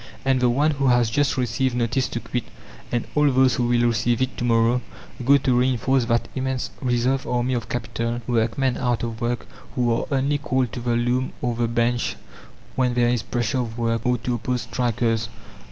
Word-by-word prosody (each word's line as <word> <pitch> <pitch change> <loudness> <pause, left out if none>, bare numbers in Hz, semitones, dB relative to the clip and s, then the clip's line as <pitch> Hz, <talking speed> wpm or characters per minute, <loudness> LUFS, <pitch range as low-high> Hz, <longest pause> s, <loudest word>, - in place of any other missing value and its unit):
And 135 -1 +3
the 125 -1 +3
one 145 +6 +2
who 140 -2 0
has 120 -2 +3
just 145 +3 +1
received 125 +1 0
notice 125 +2 0
to 120 - -4
quit, 120 0 -4 0.5
and 120 -1 -1
all 150 -1 +4
those 130 -1 +4
who 120 +2 0
will 120 0 +3
receive 120 0 +1
it 130 0 -1
to - - -3
morrow, 115 +1 +3 0.4
go 140 +3 +6
to 125 -2 +2
reinforce 130 0 +2
that 115 0 +1
immense 130 -1 -2
reserve 125 +1 0
army 125 +1 0
of 115 -2 -3
capital 115 0 -3
workmen 120 +2 0
out 120 -2 0
of 115 0 -4
work 120 0 -1 0.3
who 120 -2 +2
are 115 - -1
only 140 +1 +1
called 130 -4 0
to - - -5
the 120 0 0
loom 120 +2 0
or 120 -1 -1
the 120 0 0
bench 120 +1 0 0.6
when 125 -2 +1
there 120 -1 +3
is 120 -2 +1
pressure 120 +3 -1
of 115 -2 -4
work, 115 -1 0
or 125 0 +2
to 120 +1 -3
oppose 125 +1 -2
strikers. 115 -1 -1
120 Hz, 200 wpm, -23 LUFS, 115-130 Hz, 0.6 s, go